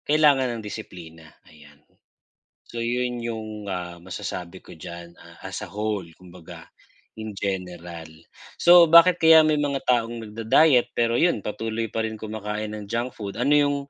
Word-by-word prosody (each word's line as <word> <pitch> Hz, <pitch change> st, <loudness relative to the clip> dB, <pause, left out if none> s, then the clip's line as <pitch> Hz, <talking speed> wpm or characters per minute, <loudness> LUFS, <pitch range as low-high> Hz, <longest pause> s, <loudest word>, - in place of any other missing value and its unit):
Kailangan 140 Hz, -5 st, +3 dB
ng 110 Hz, -, -8 dB
disiplina, 85 Hz, -7 st, -10 dB, 0.2 s
ayan. 75 Hz, -1 st, -18 dB, 0.9 s
So, -, -, -11 dB
yun 120 Hz, 0 st, -2 dB
yung, 110 Hz, -2 st, -6 dB
ah, 90 Hz, -1 st, -5 dB
masasabi 90 Hz, 0 st, -7 dB
ko -, -, -14 dB
diyan, 85 Hz, +1 st, -10 dB
ah, -, -, -16 dB
as -, -, -6 dB
a -, -, -11 dB
whole, 105 Hz, -2 st, -3 dB
kumbaga, 90 Hz, -1 st, -14 dB, 0.5 s
in 110 Hz, -1 st, -7 dB
general. 90 Hz, -4 st, -6 dB, 0.5 s
So, 175 Hz, 0 st, +8 dB
bakit 170 Hz, +2 st, +7 dB
kaya 160 Hz, -1 st, +7 dB
may 155 Hz, -1 st, +3 dB
mga 145 Hz, -2 st, -1 dB
taong 120 Hz, -1 st, +1 dB
nag-da-diet 115 Hz, +5 st, +2 dB
pero 115 Hz, 0 st, +1 dB
yun 170 Hz, -5 st, +2 dB
patuloy 115 Hz, +2 st, -4 dB
pa 110 Hz, +1 st, -3 dB
rin 110 Hz, -1 st, -5 dB
kumakain 105 Hz, 0 st, -5 dB
ng 105 Hz, -, -8 dB
junk 120 Hz, +5 st, -4 dB
food? 100 Hz, +1 st, -6 dB
Ano 140 Hz, +4 st, +3 dB
yung, 145 Hz, -1 st, +2 dB
110 Hz, 155 wpm, -24 LUFS, 95-125 Hz, 0.9 s, So